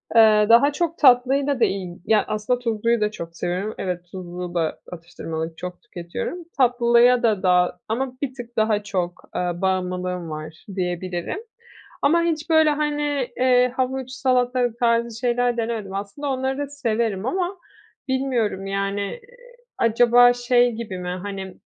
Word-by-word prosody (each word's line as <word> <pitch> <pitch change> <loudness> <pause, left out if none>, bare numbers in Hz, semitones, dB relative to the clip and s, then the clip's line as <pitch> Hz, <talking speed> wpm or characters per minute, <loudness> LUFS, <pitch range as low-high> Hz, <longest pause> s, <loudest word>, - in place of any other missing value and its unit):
Eee, 215 -2 +6
daha 275 +6 +6
çok 335 +1 -2
tatlıyla 270 +1 +4
da - - +5
iyi 185 -3 -4
ya, 220 -1 +3
aslında 215 +4 -1
tuzluyu 230 -1 0
da 210 - +1
çok 170 -5 -8
seviyorum. 185 +5 -2
Evet, 180 -1 -4
tuzlu 180 -1 -6
da 165 -2 -1
atıştırmalık 165 -1 -6
çok 180 0 -7
tüketiyorum. 180 - -6 0.2
Tatlıya 245 -1 +4
da 215 -5 +2
daha 180 -1 +3
ama 250 +4 -2
bir 265 -2 -2
tık 240 -2 -10
daha 215 -1 +2
çok, 180 -4 -3
eee, - - 0
bağımlılığım 180 -1 -2
var 155 +1 -8
diyebilirim. 180 - -3 0.6
Ama 335 +4 +4
hiç 330 -1 -2
böyle, 315 -1 +5
hani, 295 -2 -1
eee, 250 -1 +4
havuç, 260 0 -2
salatalık 250 -2 +1
tarzı 235 -1 +1
şeyler 245 0 +1
denemedim. 225 -4 -3
Aslında 205 +9 -4
onları 265 0 -1
da 285 - -2
severim 230 -6 -1
ama 365 +4 -2 0.5
bilmiyorum, 245 -7 -1
yani. 195 +1 -2
Eee, 340 - -5 0.6
acaba 245 +2 +5
şey 245 0 +2
gibi 220 -5 -6
mi? 180 0 -5
Hani, 195 -2 -6
230 Hz, 145 wpm, -23 LUFS, 185-255 Hz, 0.6 s, Eee